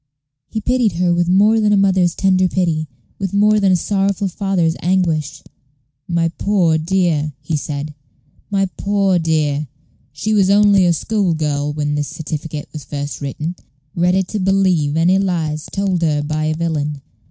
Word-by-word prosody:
He 220 - -3
pitied 240 -2 +1
her 175 +1 +1
with 175 0 +1
more 210 +4 +4
than 210 -1 +2
a 205 - +4
mother's 190 -3 +2
tender 185 -1 +2
pity, 165 -4 -1 0.3
with 195 0 -3
more 210 +1 +4
than 195 -2 +3
a - - +5
sorrowful 195 +1 0
father's 180 -3 0
anguish. 160 -5 0 0.6
"My 170 -1 +1
poor 180 -6 +2
dear!" 160 -3 0
he 160 - -3
said, 150 0 -4 0.6
"my 195 -1 +1
poor 195 -2 +1
dear! 155 -3 0 0.4
she 190 +10 -2
was 195 -3 +3
only 200 -2 +5
a 170 - +3
school 195 0 0
girl 150 -2 -1
when 145 0 -2
this 145 -1 -1
certificate 155 -1 -6
was 155 -3 -7
first 145 0 -5
written 140 +2 -5
an - - 0
innocent 180 - -17
child, 140 +4 -10
ready 180 +2 +3
to 205 +3 -5
believe 185 -5 +2
in - - 0
any 185 +3 +3
lies 160 -5 -2
told 195 -3 -1
her 150 -3 +1
by 155 +1 -2
a 155 0 0
villain." 150 -3 -2
175 Hz, 175 wpm, -18 LUFS, 155-195 Hz, 0.6 s, a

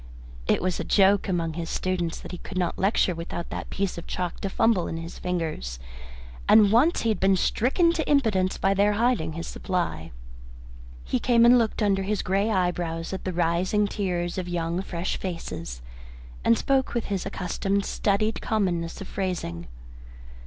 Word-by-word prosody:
It - - +2
was 185 -2 -1
a - - -1
joke 200 0 +4
among 165 -3 -1
his 165 0 -5
students 175 -3 -2
that - - -9
he 180 - -6
could 185 - -8
not 180 -2 -1
lecture 195 -1 +2
without 170 0 -6
that - - -5
piece 195 -3 -2
of - - -11
chalk 180 -2 -3
to 195 - -3
fumble 200 -2 +2
in 165 - -4
his 165 +1 -8
fingers, 160 - -3 0.7
and 210 -2 +7
once 270 +10 +4
he 230 - +1
had 215 - 0
been 195 0 +4
stricken 275 - +2
to 320 -2 -2
impotence 215 -10 +2
by 195 +1 +2
their 205 +1 +3
hiding 220 -8 +1
his 165 +2 -5
supply. 170 - -3 0.9
He - - -1
came 235 -2 +4
and 245 +1 +7
looked 225 -1 0
under 195 -2 +2
his 200 +1 -1
grey 195 +3 +1
eyebrows 175 -3 -1
at 190 - -5
the 185 - -1
rising 180 +4 +1
tiers 180 -3 -2
of 180 -1 -4
young 170 +1 -1
fresh 175 -1 -3
faces, 85 - -6 0.6
and 115 - +4
spoke 270 -2 +1
with 235 - 0
his 195 -3 -2
accustomed 195 +2 -1
studied 215 +2 0
commonness 180 -7 -1
of 195 - -6
phrasing. 175 - -3
185 Hz, 175 wpm, -26 LUFS, 170-205 Hz, 0.9 s, and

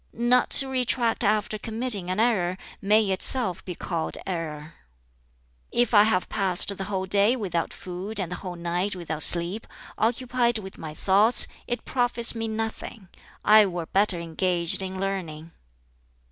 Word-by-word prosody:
"Not 240 +2 +2
to 270 - +3
retract 250 -3 0
after 215 0 0
committing 220 -4 +2
an 185 +3 -2
error 190 -6 +1 0.2
may 210 +2 +3
itself 190 0 0
be 180 - -7
called 165 -2 -4
error. 160 -4 -5 1.0
"If 240 -1 0
I 205 -1 +7
have 185 -4 0
passed 195 0 0
the 195 - -6
whole 190 -1 -3
day 200 +5 +3
without 185 -8 -3
food 190 +4 -6
and 180 -3 -4
the 180 - -4
whole 180 -1 -7
night 175 +3 -3
without 160 -3 -5
sleep, 175 +7 +2 0.3
occupied 240 +1 0
with 190 -3 -10
my 155 -2 -8
thoughts, 205 +7 +4 0.2
it 240 - -4
profits 245 -2 0
me 225 -1 -4
nothing: 220 -2 -6 0.4
I 215 -1 +6
were 175 -2 -5
better 195 0 +1
engaged 170 +1 0
in 190 0 -6
learning. 170 -5 -5
195 Hz, 150 wpm, -25 LUFS, 175-225 Hz, 1.0 s, I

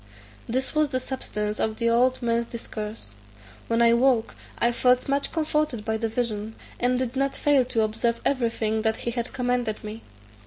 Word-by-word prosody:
This 260 +3 -1
was 305 -1 +2
the 255 -2 0
substance 215 -5 -3
of 220 0 0
the 235 - 0
old 250 +2 +3
man's 235 0 +1
discourse. 215 - -6 0.5
When 230 +1 +3
I 235 - +6
awoke 235 -1 +3 0.2
I 235 - +3
felt 250 +1 +3
much 280 +1 0
comforted 300 -8 0
by 220 -1 0
the 225 0 -1
vision, 220 -2 -2 0.2
and 250 +1 +2
did 255 0 -2
not 275 +1 0
fail 285 -3 +3
to 230 -3 +1
observe 225 +2 0
everything 230 -4 +1
that 220 0 +1
he 235 - 0
had 235 0 -3
commanded 245 -4 -1
me. 215 +1 -7
235 Hz, 180 wpm, -25 LUFS, 220-255 Hz, 0.5 s, I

